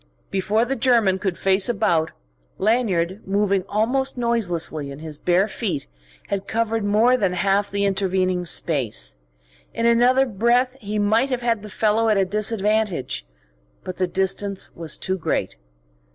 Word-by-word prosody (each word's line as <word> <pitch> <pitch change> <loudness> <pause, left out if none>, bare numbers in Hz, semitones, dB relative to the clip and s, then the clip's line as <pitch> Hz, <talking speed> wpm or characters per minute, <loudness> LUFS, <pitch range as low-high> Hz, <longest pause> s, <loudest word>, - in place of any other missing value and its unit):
Before 205 +4 +1
the 270 +2 -2
German 230 -8 +2
could 190 -3 -2
face 190 +2 +2
about, 165 -8 +1 0.5
Lanyard, 195 -4 0
moving 200 -1 +1
almost 255 +6 0
noiselessly 175 - -1
in 140 - -8
his 155 -1 -8
bare 180 +3 +2
feet, 200 - -3 0.4
had 200 -1 -3
covered 225 -1 -1
more 215 +5 +3
than 195 -7 0
half 195 +3 +1
the 200 0 -1
intervening 185 -2 0
space. 140 - +1 0.6
In 230 - -1
another 245 +3 +4
breath 245 +3 +1
he 210 -1 -4
might 220 +6 +2
have 250 -2 -2
had 230 -3 +1
the 210 - -9
fellow 220 +3 +1
at 215 - +3
a 195 - +3
disadvantage. 210 - -1 0.6
But 185 - -6
the 185 - 0
distance 190 +2 -2
was 165 -3 -4
too 190 0 -3
great. - - -2
200 Hz, 150 wpm, -22 LUFS, 185-230 Hz, 0.6 s, another